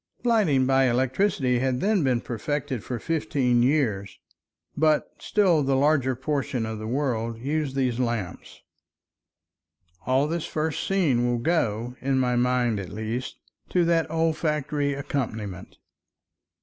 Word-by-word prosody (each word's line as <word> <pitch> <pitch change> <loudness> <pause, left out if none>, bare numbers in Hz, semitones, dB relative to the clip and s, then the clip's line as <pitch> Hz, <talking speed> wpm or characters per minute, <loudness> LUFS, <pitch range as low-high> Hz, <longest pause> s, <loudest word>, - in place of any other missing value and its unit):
Lighting 200 - +3
by 135 0 +3
electricity 130 +1 +1
had 130 0 0
then 200 -1 +2
been 125 -3 +1
perfected 130 +1 -3
for 125 - -4
fifteen 130 -4 +1
years, 120 -8 0 0.6
but 155 0 +2
still 185 -7 +2
the 135 -1 +1
larger 135 -2 +2
portion 140 -2 -2
of 110 -1 -5
the 110 - -5
world 115 -3 -1
used 140 +2 -2
these 130 -3 0
lamps. 115 -7 -3 1.5
All 130 +2 +3
this 165 0 -3
first 155 0 -2
scene 145 -11 +2
will 120 0 +1
go, 120 -4 -1
in 135 0 +1
my 125 -1 +1
mind 120 -3 +1
at 95 -3 -6
least, 110 +4 -4 0.3
to 180 -2 +2
that 165 -1 +2
olfactory 150 -3 0
accompaniment. 110 -9 -4
130 Hz, 130 wpm, -25 LUFS, 120-150 Hz, 1.5 s, Lighting